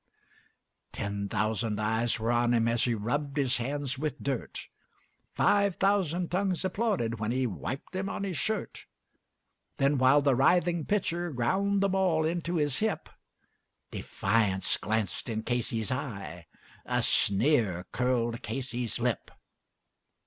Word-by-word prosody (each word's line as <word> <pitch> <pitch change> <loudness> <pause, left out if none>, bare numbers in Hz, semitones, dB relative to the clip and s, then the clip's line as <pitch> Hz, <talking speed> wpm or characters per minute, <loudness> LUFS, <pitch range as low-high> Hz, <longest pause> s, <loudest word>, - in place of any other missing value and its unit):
Ten 100 0 -3
thousand 105 0 -1
eyes 110 +2 0
were 115 +2 0
on 120 0 +3
him 115 0 +2
as 115 0 +2
he 120 -2 +1
rubbed 140 +7 -2
his 135 -3 +2
hands 135 +1 -2
with 150 -1 -3
dirt, 135 -4 -3 0.7
Five 200 -2 +3
thousand 185 -3 +1
tongues 190 0 0
applauded 185 - -1
as 110 +1 0
he 130 +1 +1
wiped 125 - -5
them 190 +1 -2
on - - -4
his 190 -3 -3
shirt; 220 -1 -3 0.9
And 140 0 +2
while 135 +3 +5
the 140 -1 +4
writhing 170 +5 +3
pitcher 175 -4 0
ground 190 +10 +1
the 200 - +3
ball 185 -5 +2
into 170 +1 -1
his 145 -4 +1
hip 220 -1 -1 0.8
Defiance 100 -4 +1
gleamed 110 -2 0
from 110 -2 -4
Casey's 120 -2 -1
eye 100 - -5 0.4
a - - 0
sneer 100 - +2
curled 120 -2 0
Casey's 120 0 -3
lip. - - -1
130 Hz, 135 wpm, -29 LUFS, 115-175 Hz, 0.9 s, while